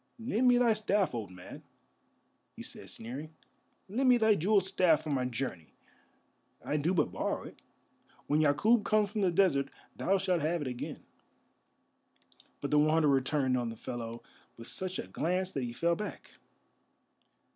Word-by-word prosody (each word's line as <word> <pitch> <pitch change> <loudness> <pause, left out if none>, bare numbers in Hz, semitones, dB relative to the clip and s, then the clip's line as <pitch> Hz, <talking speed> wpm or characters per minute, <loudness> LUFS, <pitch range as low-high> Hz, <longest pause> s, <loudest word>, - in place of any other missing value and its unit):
"Lend 235 +1 0
me 245 0 +6
thy 240 -2 +4
staff, 210 -4 +1
old 110 -5 -4
man," 90 -1 -11 0.9
he - - -8
said, - - -5
sneering; 140 +8 -6 0.5
"lend 255 +7 +1
me 250 - +6
thy 220 -2 +4
jewelled 200 +2 +3
staff 180 -5 +3
for 155 - -4
my 130 -2 0
journey. 120 - -5 0.9
I 150 - 0
do 165 +6 0
but 160 - +1
borrow - - -2
it; - - -12 0.6
when 150 - +1
Yakûb 205 +10 +3
comes 210 -1 +2
from 210 -1 -2
the 190 - +3
desert 165 -7 +2 0.3
thou 195 - +1
shalt 185 -3 0
have 165 +2 0
it - - -4
again." 125 -1 -6 1.6
But 140 - -3
the 150 - +5
Wanderer 150 -3 +4
turned 130 -1 0
on 120 -2 -1
the 115 - -7
fellow 115 -1 -6 0.3
with 115 0 -9
such 185 0 -1
a - - -4
glance 180 - -1
that 135 - -3
he 120 - -4
fell 170 +8 +1
back. 210 - -7
160 Hz, 165 wpm, -31 LUFS, 130-195 Hz, 1.6 s, me